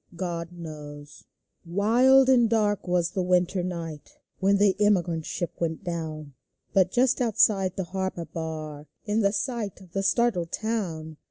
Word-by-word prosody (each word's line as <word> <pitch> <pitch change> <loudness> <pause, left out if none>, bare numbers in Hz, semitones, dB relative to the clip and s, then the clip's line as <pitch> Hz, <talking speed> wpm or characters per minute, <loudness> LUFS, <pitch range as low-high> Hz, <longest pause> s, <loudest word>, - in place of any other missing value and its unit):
"GOD 170 -1 -4
KNOWS" 150 -3 -10 0.4
Wild 235 +9 +4
and 245 -3 +5
dark 210 -3 +1
was 175 -1 +1
the 190 - -1
winter 180 +1 +1
night 165 -4 -6 0.2
When 195 +1 +3
the 200 -2 +3
emigrant 175 -6 +1
ship 175 -2 -3
went 165 +2 -2
down, 160 -4 -5 0.4
But 185 -2 +4
just 255 +4 +2
outside 200 -5 +3
of - - -37
the 190 - -2
harbor 190 -1 -4
bar, 155 -3 -6 0.2
In 210 +1 0
the 200 -2 +3
sight 215 -2 -3
of 185 -3 -16
the 195 - -1
startled 195 -5 +1
town. 170 -9 -3
180 Hz, 155 wpm, -26 LUFS, 165-205 Hz, 0.4 s, and